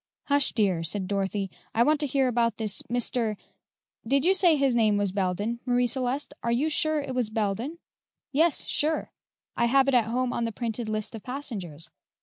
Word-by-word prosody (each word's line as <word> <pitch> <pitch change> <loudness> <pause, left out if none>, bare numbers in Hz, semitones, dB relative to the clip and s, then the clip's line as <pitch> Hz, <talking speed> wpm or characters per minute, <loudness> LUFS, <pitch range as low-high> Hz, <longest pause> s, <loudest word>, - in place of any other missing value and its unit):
"Hush, 285 -1 +2
dear!" 195 -6 +1
said 185 +3 -2
Dorothy; 195 -1 -2 0.2
"I 230 - +5
want 300 +3 +3
to 295 - 0
hear 270 0 +1
more 255 - +2
about 235 -2 +1
this 215 -3 0
Mr. 235 -3 0 0.7
did 275 +4 +2
you 375 - +5
say 360 -4 +4
his 275 -4 +2
name 215 -3 +3
was 200 -2 0
Belden, 200 +4 -1
Marie 245 -1 +2
Celeste? 260 +3 -1
Are 235 - -1
you 270 +7 +1
sure 310 0 +1
it 275 -2 -5
was 250 -4 0
Belden?" 220 - -2 0.5
"Yes, 315 +3 +2
sure; 310 +2 0 0.4
I - - +2
have 270 +3 +4
it 275 - +2
at 240 -3 +4
home 245 +2 -1
in 235 - -1
the 230 - -2
printed 230 0 -4
list 215 +1 -3
of 225 - -7
passengers. 205 - -5
240 Hz, 195 wpm, -27 LUFS, 210-275 Hz, 0.7 s, I